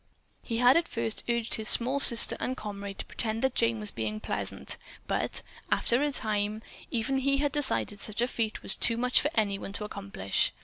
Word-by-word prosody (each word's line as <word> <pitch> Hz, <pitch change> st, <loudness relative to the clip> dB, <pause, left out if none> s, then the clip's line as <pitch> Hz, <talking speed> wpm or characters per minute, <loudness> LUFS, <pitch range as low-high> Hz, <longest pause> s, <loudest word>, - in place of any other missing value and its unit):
He 230 Hz, -, -4 dB
had 245 Hz, +4 st, +5 dB
at 335 Hz, -, 0 dB
first 115 Hz, -1 st, -2 dB
urged 235 Hz, -1 st, -1 dB
his 220 Hz, -1 st, +1 dB
small 260 Hz, +4 st, +6 dB
sister 235 Hz, -4 st, +7 dB
and 260 Hz, +1 st, -3 dB
comrade 200 Hz, -2 st, -7 dB
to -, -, -3 dB
pretend 225 Hz, 0 st, -4 dB
that 265 Hz, -1 st, +1 dB
Jane 230 Hz, -2 st, +1 dB
was 210 Hz, -1 st, -2 dB
being 110 Hz, -2 st, -4 dB
pleasant, -, -, -5 dB, 0.3 s
but, -, -, -2 dB, 0.3 s
after 240 Hz, +3 st, +1 dB
a 295 Hz, 0 st, 0 dB
time, 215 Hz, -3 st, -2 dB, 0.3 s
even 250 Hz, +3 st, -1 dB
he 275 Hz, +1 st, +1 dB
had 285 Hz, 0 st, 0 dB
decided 265 Hz, -7 st, -1 dB
that -, -, -3 dB
such 215 Hz, +1 st, -3 dB
a -, -, +1 dB
feat 225 Hz, -3 st, -3 dB
was -, -, +7 dB
too 230 Hz, -, +4 dB
much 250 Hz, +1 st, +2 dB
for 295 Hz, -, 0 dB
anyone 200 Hz, -2 st, -1 dB
to 210 Hz, -, -4 dB
accomplish. 200 Hz, -, -3 dB
225 Hz, 205 wpm, -28 LUFS, 205-255 Hz, 0.3 s, sister